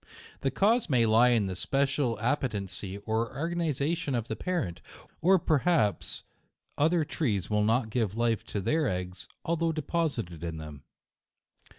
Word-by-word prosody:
The 135 - 0
cause 210 - +2
may 125 -4 +4
lie 115 +3 +5
in 115 -4 +3
the 95 -1 -3
special 135 0 0
appetency 105 -6 -2
or 115 +1 0
organi 165 +4 -1
zation 145 0 -1
of 115 -1 -3
the 110 - -1
parent, 170 - -2 0.4
or 190 +3 +6
perhaps 155 - +1 0.5
other 160 +2 +2
trees 110 - -1
will 105 0 +3
not 110 +1 +1
give 110 -3 -1
life 115 -2 +1
to 100 - -3
their 155 +9 +1
eggs, 90 -1 -4 0.2
although 165 0 +1
de 155 -1 -3
posited 115 - -2
in 85 -2 -4
them. 75 -3 -8
120 Hz, 155 wpm, -29 LUFS, 105-155 Hz, 0.5 s, or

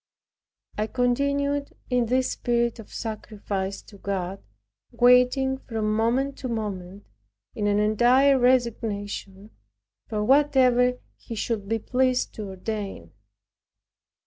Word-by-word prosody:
I 215 - 0
continued 280 +4 0 0.2
in 245 -2 +2
this 255 +2 +1
spirit 235 -1 0
of 225 - -11
sacrifice 205 -3 -4
to 200 - -16
God, 195 -1 -3 0.5
waiting 250 +2 +4
from 220 -4 -2
moment 250 +5 0
to 260 - -4
moment 200 -4 -5 0.5
in 205 -1 -1
an 205 0 +2
entire 245 +6 +4
resignation, 215 -5 -1 0.6
for 210 -2 -2
whatever 255 -2 +4 0.2
He 230 - -8
should 210 -2 -3
be 225 - +1
pleased 255 +3 0
to 210 -2 -6
ordain. 195 - -5
230 Hz, 110 wpm, -25 LUFS, 205-255 Hz, 0.6 s, waiting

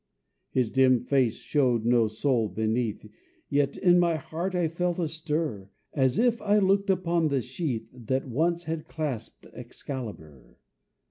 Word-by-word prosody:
His 125 -4 0
dim 130 -2 +4
face 130 -3 +1
showed 125 -6 +1
no 120 -1 +4
soul 115 0 0
beneath, 110 +2 -1 0.4
Yet 140 -1 +1
in 180 -1 +5
my 170 -2 +3
heart 170 +5 -4
I 175 -2 +2
felt 175 +2 -1
a 170 -3 0
stir, 155 - -3 0.2
As 130 -3 +2
if 235 0 +2
I 210 0 +3
looked 200 0 +2
upon 170 -3 +2
the 140 -2 +1
sheath 125 -3 -3
That 130 +2 -2
once 170 +7 0
had 160 -1 -4
clasped 140 -8 -5
Excalibur. 115 - -8
140 Hz, 145 wpm, -27 LUFS, 120-170 Hz, 0.4 s, in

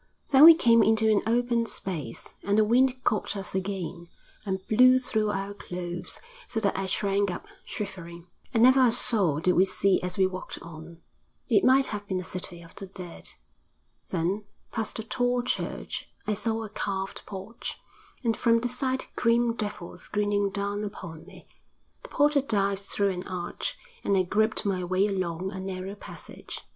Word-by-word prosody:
Then 280 +1 +8
we 330 0 +11
came 230 -7 +5
into 220 0 +4
an 205 - +3
open 235 0 +1
space, 160 - -5
and 200 +1 +1
the 215 - +6
wind 255 +3 +3
caught 210 -1 0
us 195 - -6
again, 190 -3 -4 0.4
and 190 -2 -4
blew 255 +3 +6
through 220 -4 0
our 195 0 -3
clothes, 175 -2 -5 0.3
so 225 - -2
that 200 -3 0
I 195 0 -2
shrank 200 +1 +1
up, 175 - -5 0.2
shivering. 170 -4 -7 0.3
And 230 -1 +3
never 260 +1 +7
a - - +3
soul 195 - +2
did 180 - +3
we 180 - +5
see 195 0 +2
as 180 0 -4
we 190 - +4
walked 185 0 -5
on; 165 0 -11 0.5
it 390 - +4
might 265 +1 +5
have 205 0 -5
been 190 -2 -1
a - - -5
city 180 -1 -6
of 165 - -15
the 195 - -8
dead. 180 -2 -9 0.8
Then 190 +6 -1 0.3
past 225 -1 -2
a 220 - -4
tall 245 +2 0
church: 250 - -3 0.2
I 215 - 0
saw 225 +2 -1
a 215 - -7
carved 195 -1 -4
porch, 200 +3 -6 0.5
and 230 -2 +1
from 230 0 +3
the 245 - 0
side 260 +1 0
grim 235 0 +2
devils 205 -6 -5
grinning 205 -1 +1
down 200 +1 -2
upon 180 -6 -8
me; - - -15 0.5
the - - -11
porter 290 0 +3
dived 200 -6 0
through 200 0 +1
an 180 0 -5
arch, 180 -2 -4 0.3
and 200 - +2
I 185 - +4
groped 215 +5 0
my 190 -2 0
way 185 +2 +2
along 185 -2 -2
a 190 - -6
narrow 190 0 -5
passage. 205 - -9
200 Hz, 175 wpm, -27 LUFS, 185-230 Hz, 0.8 s, we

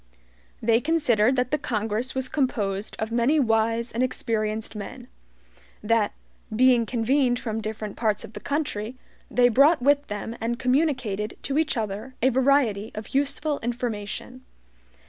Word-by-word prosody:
They 230 +1 +3
considered 260 -7 +3
that 250 -1 0
the 300 - +1
Congress 225 -1 -2
was 260 -1 0
composed 215 -8 -1
of 220 +1 -3
many 240 +7 +3
wise 230 -1 +1
and 235 - -2
experienced 220 -3 -1
men. 245 +4 -7 0.8
That, 220 -1 +2 0.4
being 245 -1 +4
convened 245 +2 +2
from 225 -2 -3
different 215 -1 -5
parts 215 -3 0
of 220 - -10
the - - -7
country, 255 -6 -3 0.3
they 245 0 +4
brought 285 +7 +5
with 285 +1 +3
them 210 +2 -5
and 235 +1 -1
communicated 250 -6 0
to 280 +2 0
each 310 -4 0
other 220 +4 -4
a 260 - +4
variety 255 -5 +2
of 215 +1 -7
useful 285 +2 0
information. 235 +1 -4
235 Hz, 145 wpm, -25 LUFS, 215-265 Hz, 0.8 s, brought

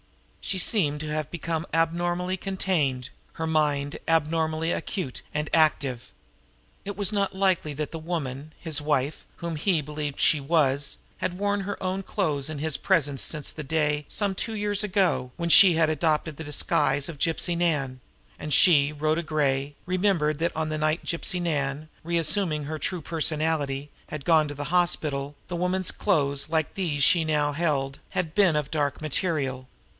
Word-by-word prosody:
She 190 - -1
seemed 170 -6 +1
to 155 - -5
have 155 -1 -2
become 165 -1 -3
abnormally 175 +3 0
contained, 175 -10 -1 0.2
her 160 - -3
mind 150 -3 0
abnormally 160 0 +1
acute 175 - -3
and 150 0 -1
active. 140 -6 +1 0.7
It 200 -1 -6
was 205 0 +1
not 200 -2 0
likely 190 -6 +1
that 150 0 -3
the 165 - -5
woman, 155 -3 -4
his 160 -3 -3
wife, 145 -1 -1
whom 170 -1 -4
he 165 +2 +1
believed 150 -1 -5
she 155 - +4
was, 140 -2 +1 0.2
had 180 - -2
worn 205 0 0
her 200 +1 -5
own 185 +1 -1
clothes 155 -8 -1
in 155 - -5
his 155 +1 -1
presence 145 -8 +1
since 150 -3 -1
the 155 - -7
day, 150 0 0
some 200 -2 0
two 220 +4 -3
years 205 0 -1
ago, 185 -10 +1
when 170 -1 -2
she 175 +2 +9
had 160 -1 +3
adopted 155 0 0
the 160 - -6
disguise 145 -1 0
of 165 -4 -8
Gypsy 170 +2 0
Nan; 145 -7 0 0.4
and 150 - -5
she, 145 -2 +6
Rhoda 155 +2 0
Gray, 145 -2 0
remembered 180 -5 +1
that 170 +1 0
on 160 0 -1
the 155 0 -2
night 155 +2 0
Gypsy 175 +1 -1
Nan, 150 -3 -1 0.2
re 170 +1 0
assuming 165 -2 +1
her 155 +2 -5
true 180 +3 -2
personality, 155 -3 -1 0.2
had 145 -3 -7
gone 160 -2 +4
to 145 - -6
the 145 +1 -5
hospital, 145 -5 0
the 180 - -4
woman's 180 +1 0
clothes, 140 -7 0
like 160 -1 0
these 155 -7 -1
she 175 - +6
held 150 -2 0
now, 145 -4 0 0.2
had 165 -4 -2
been 190 -6 +4
of 150 -2 -1
dark 145 -3 0
material. 140 -4 -1
155 Hz, 170 wpm, -26 LUFS, 145-175 Hz, 0.7 s, she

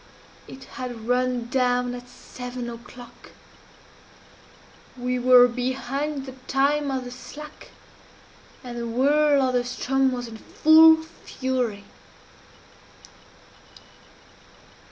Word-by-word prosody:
_It 265 0 -11
had 245 -4 -8
run 250 -1 0
down 250 -1 +1
at 245 0 -9
seven 250 -1 -8
o'clock! 240 +1 -13 1.6
We 250 0 -2
were 245 0 +7
behind 265 +3 -3
the 265 - -8 0.2
time 280 +2 +1
of 265 -1 -2
the 245 - -8
slack, 300 +4 -11 0.9
and 240 -1 -7
the 235 - -4
whirl 285 +4 +3
of 255 -1 0
the 250 - +3
Ström 265 +2 0
was 245 -1 -4
in 225 -1 -10
full 320 +6 +6
fury! 255 -8 -4
255 Hz, 100 wpm, -24 LUFS, 245-270 Hz, 1.6 s, were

